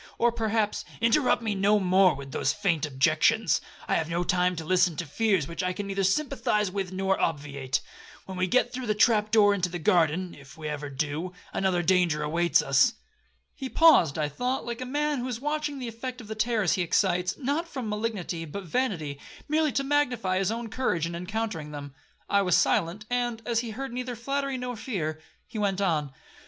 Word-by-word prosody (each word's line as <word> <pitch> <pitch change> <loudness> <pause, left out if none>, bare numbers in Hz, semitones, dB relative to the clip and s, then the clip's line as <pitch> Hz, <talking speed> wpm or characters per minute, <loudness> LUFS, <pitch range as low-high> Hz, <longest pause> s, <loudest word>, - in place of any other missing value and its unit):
Or 240 0 +3
perhaps—' 220 -2 0 0.2
'Interrupt 240 +1 +3
me 220 -2 0
no 200 +2 +3
more 185 0 +4
with 135 0 -9
those - - 0
faint 175 -7 0
objections; 155 +9 +2 0.3
I - - 0
have 160 - -2
no 170 +1 0
time 180 0 +1
to 160 -1 -6
listen 180 -1 +3
to 170 - -3
fears 190 0 +1
which 170 - -4
I 180 0 -1
can 200 +2 -5
neither 195 0 -2
sympathise 210 -2 +1
with 190 -1 -4
or 195 0 +1
obviate. 140 -4 -1 0.4
When 190 - -7
we 185 0 0
get 255 - +2
through 255 -1 -4
the 215 - +1
trap 210 -1 +3
door 210 -2 +5
into 185 -3 0
the 175 - -4
garden, 175 +1 +2
(if 140 +1 -14
ever 150 -1 -4
we 135 - -11
do), 150 +6 -2 0.2
another 185 -2 +1
danger 175 -4 +2
awaits 170 +3 +2
us.' - - +4 0.6
He 265 -2 -6
paused, 285 - +5
I 150 -1 0
thought, 250 - -2
like 240 0 -5
a 255 - -4
man 295 +1 0
who 245 - -3
is 245 -3 -4
watching 295 +1 -2
the 255 -2 -5
effect 250 +3 -6
of 225 - -10
the 220 - -4
terrors 215 -4 +1
he 185 - 0
excites, 180 +1 +1
not 290 +5 -1
from 260 -8 -5
malignity 210 -6 -3
but 195 +6 -6
vanity, 170 - -2 0.3
merely 310 0 +2
to 275 - 0
magnify 245 -10 +1
his 195 - +1
own 230 0 -4
courage 200 -10 0
in 170 - -4
encountering 180 -3 -3
them. 145 -2 -8 0.3
I 200 - +3
was 180 -3 +3
silent; 205 +2 +1
and, 240 -2 0
as 235 -2 +1
he 235 -1 -4
heard 265 +3 -5
neither 250 0 -4
flattery 275 +3 -2
nor 250 -1 -4
fear, 170 -10 -3 0.2
he 225 - -7
went 200 -2 0
on. 155 -8 0
200 Hz, 200 wpm, -27 LUFS, 170-240 Hz, 0.6 s, door